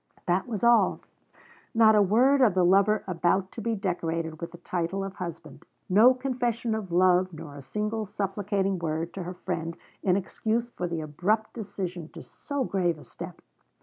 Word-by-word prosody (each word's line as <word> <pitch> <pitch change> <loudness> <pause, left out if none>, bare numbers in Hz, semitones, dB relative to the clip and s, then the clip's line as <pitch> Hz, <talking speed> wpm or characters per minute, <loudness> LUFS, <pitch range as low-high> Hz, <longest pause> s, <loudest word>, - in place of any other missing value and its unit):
That 185 +4 +1
was 220 -4 -4
all. 235 0 +4 0.7
Not 220 -1 +7
a 210 - +5
word 250 +8 +4
of 220 -7 +4
the 180 -1 +4
lover 200 +4 +4
about 185 +1 0
to 230 - -7
be 230 +1 -1
decorated 165 -4 -2
with 170 0 -5
the 175 - -11
title 175 +2 -2
of 195 0 -6
husband. 165 -5 -7 0.2
No 225 +7 +6
confession 245 -3 -1
of 215 -5 -4
love, 185 +1 +4
nor 150 -2 -9
a 140 - -8
single 210 +8 -3
supplicating 195 -1 -1
word 165 +1 -2
to 195 - -5
her 180 +1 -6
friend, 170 -2 -4 0.2
in 180 -2 +2
excuse 225 +4 -1
for 180 - -3
the 170 -2 -3
abrupt 185 +9 -1
decision 185 -6 -5
to - - -9
so 285 -2 -4
grave 180 -7 0
a 150 - -13
step. - - -10
190 Hz, 180 wpm, -27 LUFS, 175-220 Hz, 0.7 s, Not